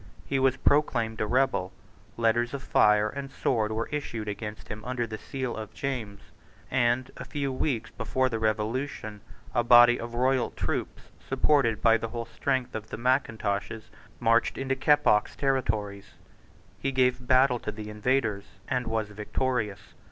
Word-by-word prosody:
He 135 - 0
was 130 -1 +3
proclaimed 120 -8 +1
a 105 - 0
rebel: 125 -6 +1 0.5
letters 120 +2 +1
of 135 - -6
fire 105 0 +4
and 135 +4 -6
sword 110 -6 0
were 110 +1 -2
issued 120 -7 -4
against 105 +1 -6
him 105 0 -7
under 125 -1 -2
the 110 -1 -7
seal 130 0 -4
of 110 -2 -8
James; 115 -7 -4 0.5
and, 125 0 +1
a - - -6
few 140 -3 -3
weeks 130 -4 -2
before 130 +3 0
the 115 -3 -2
Revolution, 110 0 -2 0.3
a 120 - +2
body 120 +1 +7
of 120 0 -6
royal 130 0 +2
troops, - - -4 0.2
supported 120 -8 +2
by 115 0 +6
the 115 - -4
whole 115 0 -5
strength 125 +2 -2
of 110 0 -6
the - - -5
Mackintoshes, 115 -4 -1 0.3
marched 115 0 +2
into 135 0 -1
Keppoch's 140 -6 +3
territories. 105 -7 -1 0.6
He 135 - -1
gave 125 -1 +1
battle 130 -1 +4
to 105 - -4
the 105 0 -7
invaders, 105 -2 0 0.2
and 125 -1 -1
was 110 -2 -1
victorious. 105 0 -3
120 Hz, 155 wpm, -27 LUFS, 110-130 Hz, 0.6 s, body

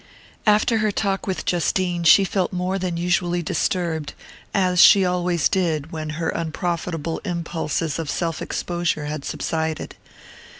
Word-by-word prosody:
After 215 +2 +4
her 215 -1 +1
talk 195 -1 -1
with 190 - -3
Justine 175 0 0
she 195 - +7
felt 190 -1 -1
more 185 +1 -1
than 180 -2 -2
usually 175 0 0
disturbed, 160 -2 -1 0.4
as 185 -2 +3
she 195 -2 +8
always 180 -2 +1
did 165 -6 -1
when 155 -1 -5
her 165 - -1
unprofitable 165 -1 -3
impulses 165 -4 -2
of 160 -3 -4
self 165 -2 -2
exposure 175 -3 -2
had 150 -1 -4
subsided. 160 +1 -3
175 Hz, 135 wpm, -22 LUFS, 160-185 Hz, 0.4 s, she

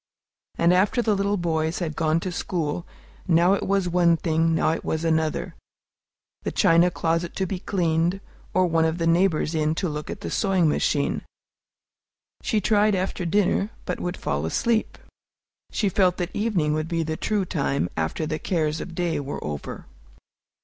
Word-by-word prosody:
And 170 +1 +4
after 205 +7 +2
the 220 - +2
little 200 +1 0
boys 160 -2 -1
had 160 -4 -3
gone 160 +1 +1
to 185 - -3
school, 170 -2 -3 0.4
now 175 +2 +4
it 200 - 0
was 195 -2 +1
one 170 -1 +3
thing, 165 0 +1
now 160 - +2
it 165 - -3
was 160 +1 -2
another, 160 -1 0 0.9
the - - -3
china 170 +2 +4
closet 165 0 -1
to 190 - 0
be 185 0 -4
cleaned, 175 -1 0 0.3
or 185 0 +3
one 165 -2 +2
of 160 +1 0
the 165 - -1
neighbors 165 -1 +2
in 155 0 +1
to 180 - -1
look 150 -1 -5
at 195 - -6
the - - -5
sewing 190 -5 +2
machine. 145 -1 +1 1.2
She 220 - +1
tried 210 0 +3
after 185 -1 -2
dinner, 200 +2 +2 0.2
but 180 - -3
would 180 +1 -3
fall 70 +1 -2
asleep. 225 - 0 0.7
She 210 - 0
felt 185 -1 +2
that 175 0 -4
evening 195 -9 +1
would 155 +1 -1
be 165 -1 -1
the 160 0 -3
true 205 +3 -1
time, 140 - -1
after 80 - -2
the 155 0 -3
cares 155 -3 -1
of 175 - -7
day 175 -3 0
were 145 0 -5
over. 75 -1 -6
170 Hz, 175 wpm, -24 LUFS, 160-190 Hz, 1.2 s, And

